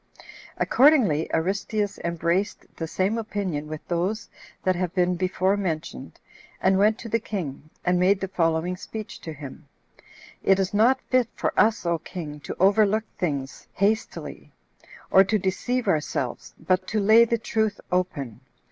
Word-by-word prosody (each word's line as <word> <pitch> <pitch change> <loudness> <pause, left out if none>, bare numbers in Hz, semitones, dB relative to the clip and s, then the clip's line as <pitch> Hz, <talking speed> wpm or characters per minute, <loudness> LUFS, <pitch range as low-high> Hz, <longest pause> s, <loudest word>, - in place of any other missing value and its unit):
Accordingly 245 - +4
Aristeus 200 +4 -1
embraced 170 +3 -1
the 165 - -4
same 195 +7 0
opinion 195 -9 -3
with 155 0 -8
those 185 +6 -1 0.4
that 185 0 +2
have 180 0 -2
been 180 -1 +2
before 185 +2 +1
mentioned, 170 -5 -4 0.4
and 190 +1 +3
went 215 +2 +4
to 235 - -8
the 230 +1 +1
king, 160 -9 -5 0.2
and 180 0 +2
made 190 +2 +3
the 195 - -3
following 170 -1 0
speech 210 +3 -8
to 160 - -6
him: 145 0 -10 0.7
"It 195 - +4
is 195 0 -1
not 230 +6 +4
fit 255 -3 +4
for - - -1
us, 220 -3 +3
O 170 -1 +1
king, 150 -3 -7
to - - -7
overlook 205 +3 +4 0.2
things 140 -6 -3
hastily, 215 +4 -2 0.6
or 190 - +8
to 215 +3 +1
deceive 210 +6 -1
ourselves, 150 -7 -2
but 185 +3 0
to 215 - 0
lay 220 +3 +7
the 235 0 +1
truth 220 -1 -1
open. 145 - -2
185 Hz, 150 wpm, -25 LUFS, 170-215 Hz, 0.7 s, or